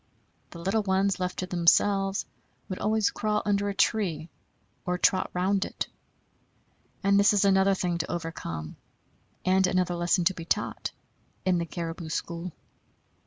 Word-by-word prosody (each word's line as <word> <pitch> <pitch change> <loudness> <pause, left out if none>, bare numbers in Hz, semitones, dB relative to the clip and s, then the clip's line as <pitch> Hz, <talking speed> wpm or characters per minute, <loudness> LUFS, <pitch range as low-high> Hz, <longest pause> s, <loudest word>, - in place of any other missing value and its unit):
The - - -11
little 195 +6 0
ones, 195 -1 +1
left 180 0 -2
to 185 - -2
themselves, 195 +3 +2 0.4
would 185 - -5
always 215 -1 +2
crawl 210 0 -1
under 205 0 +1
a 200 - -4
tree, 185 -6 +1 0.5
or 180 0 -1
trot 185 +1 +2
round 190 +2 +1
it. - - -4 1.2
And 200 0 +4
this 200 +1 +5
is 200 -1 +3
another 195 0 +4
thing 175 -2 -1
to 170 - -2
overcome, 155 - -5 0.7
and 185 0 +4
another 180 -1 +1
lesson 175 +1 +1
to 190 - +3
be 170 - -7
taught 165 - -1 0.6
in 180 -2 +3
the 170 - -3
caribou 165 -1 -5
school. 170 +2 -4
185 Hz, 150 wpm, -27 LUFS, 170-200 Hz, 1.2 s, this